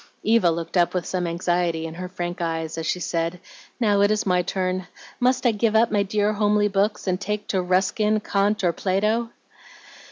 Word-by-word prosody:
Eva 220 -5 +4
looked 165 +2 -3
up 175 +1 +2
with 180 - -1
some 180 -2 -2
anxiety 170 -1 -1
in 160 - -6
her 180 +2 -6
frank 175 0 -5
eyes 165 -1 -2
as 165 -1 -4
she 180 - 0
said, 170 0 -2 0.4
"Now 205 -4 +3
it 205 - +4
is 215 0 0
my 180 -2 +2
turn. 185 0 -2 0.3
Must 255 +1 +1
I 240 - +5
give 220 0 0
up 225 +1 +4
my 205 -1 +2
dear 205 +1 0
homely 210 0 +2
books, 205 +2 0
and 185 0 -1
take 210 +1 -3
to 190 - +1
Ruskin, 190 +4 +1
Kant, 205 +1 0
or 175 -2 +2
Plato?" 210 +6 0
190 Hz, 195 wpm, -23 LUFS, 175-210 Hz, 0.4 s, I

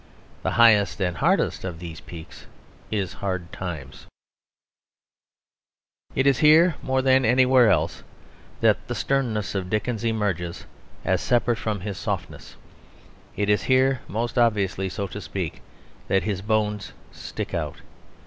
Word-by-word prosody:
The - - -1
highest 110 -4 +5
and 90 -3 0
hardest - - +1
of 90 -3 -5
these 80 -2 -8
peaks 80 -2 -11 0.4
is 100 -4 -2
Hard 95 -3 -4
Times. 80 -7 -7 2.1
It 135 - +2
is 140 -2 +4
here 160 +3 +6
more 130 0 0
than 130 0 +4
anywhere 125 0 +5
else 95 - +1 0.6
that - - +2
the - - -3
sternness 120 -7 -1
of 95 -2 -3
Dickens 110 +2 -1
emerges 100 -7 -2 0.4
as - - +1
separate 120 -1 +1
from 105 -3 -2
his 100 0 -5
softness; - - -5 0.8
it 105 0 -1
is 105 0 +3
here, 130 0 +3
most 115 +4 -2
obviously, 100 -5 +1
so 100 +2 -3
to 95 - -7
speak, - - -5 0.5
that 95 -2 +2
his 100 -2 -2
bones 105 -1 -1 0.2
stick - - -6
out. - - -3
105 Hz, 135 wpm, -24 LUFS, 95-125 Hz, 2.1 s, here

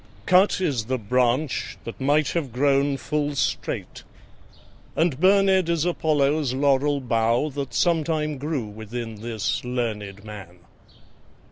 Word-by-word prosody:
Cut 185 +2 +4
is 140 -12 0
the 130 +2 -1
branch 125 +5 0
that 115 - -8
might 145 +3 +2
have 155 -7 -2
grown 140 +2 +2
full 145 +2 -2
straight, - - -2 0.9
And 155 -4 +1
burned 190 -1 +4
is 170 -1 +1
Apollo's 150 -5 +1
laurel 140 +1 +2
bough, 120 +2 +1
That 135 -4 -5
sometime 155 -4 +1
grew 145 -4 -2
within 110 +1 -7
this 115 -3 -2
learned 110 -5 -3
man. 100 -5 -10
140 Hz, 120 wpm, -24 LUFS, 115-155 Hz, 0.9 s, Cut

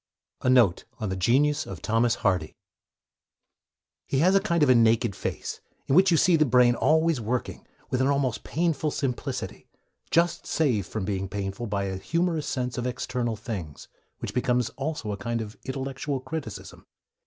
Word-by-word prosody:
A - - +1
NOTE 120 -9 +4
ON 110 - -2
THE 95 - -2
GENIUS 140 +10 +2
OF 95 - -6
THOMAS 115 +3 +2
HARDY 90 -5 +1 1.5
He 135 - 0
has 180 +7 +4
a 195 - +6
kind 170 -5 +1
of 130 -3 +5
naked 115 -2 +3
face, - - -4 0.2
in - - 0
which 190 +5 +6
you 170 - +4
see 175 +2 +5
the 155 - +4
brain 125 -3 +5
always 160 +1 +2
working, 120 +3 -3 0.2
with 130 - +1
an 130 - +3
almost 140 -4 0
painful 160 -2 0
simplicity 135 -1 -4 0.4
just 170 0 +1
saved 120 - +1
from 105 -3 -4
being 95 -1 -2
painful 100 +3 -4
by 100 -1 -1
a 95 -1 -3
humorous 165 - -1
sense 125 -1 -2
of 125 - -2
external 125 -1 -2
things, 100 - -7 0.3
which - - -6
becomes 125 -2 +1
also 135 -6 -4
a 100 - -3
kind 115 +4 -2
of 110 -1 -6
intellectual 135 +1 -3
criticism. 160 +4 -7
125 Hz, 165 wpm, -26 LUFS, 110-150 Hz, 1.5 s, a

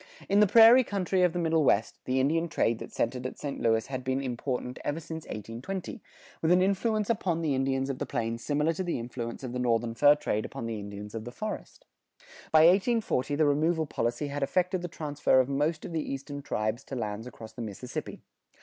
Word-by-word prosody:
In 200 +1 +3
the 210 - +6
prairie 230 +5 +8
country 190 -4 0
of 180 -1 +4
the 175 - -4
Middle 160 -2 +2
West, 110 -5 +2
the 130 +1 +1
Indian 165 +5 +2
trade 115 -5 +1
that - - -8
centered 125 +2 -1
at - - -9
St. 140 -2 -5
Louis 115 -1 +2
had 130 -1 -5
been 130 +1 0
important 125 -1 -3
ever 145 +3 -2
since 160 0 -7
1820, 130 - -6 0.4
with 160 - +2
an 180 +1 +5
influence 210 +2 +1
upon 180 -7 0
the 150 -3 +1
Indians 135 0 0
of 135 -2 -4
the - - -3
plains 115 0 -3
similar 150 +2 +1
to 185 - -3
the 175 - -2
influence 120 +1 -6
of 125 -2 -5
the 125 - -2
northern 115 -1 +1
fur 145 +5 +6
trade 110 -7 -2
upon - - -6
the 115 -2 -3
Indians 100 0 -8
of 115 -1 -5
the 120 - -7
forest. 215 - -6 0.7
By 155 - +7
1840 185 - +3
the 155 +1 +3
removal 160 +3 +2
policy 120 +1 -2
had 145 +1 -4
effected 180 +5 +1
the 175 - -3
transfer 150 -5 +1
of 130 - +3
most 150 +3 -1
of 180 - -6
the 160 - 0
eastern 140 0 -5
tribes 110 0 -2
to 135 - -6
lands 110 -1 -4
across 110 -3 -10
the 120 - -7
Mississippi. 115 +3 -6
140 Hz, 215 wpm, -29 LUFS, 120-170 Hz, 0.7 s, prairie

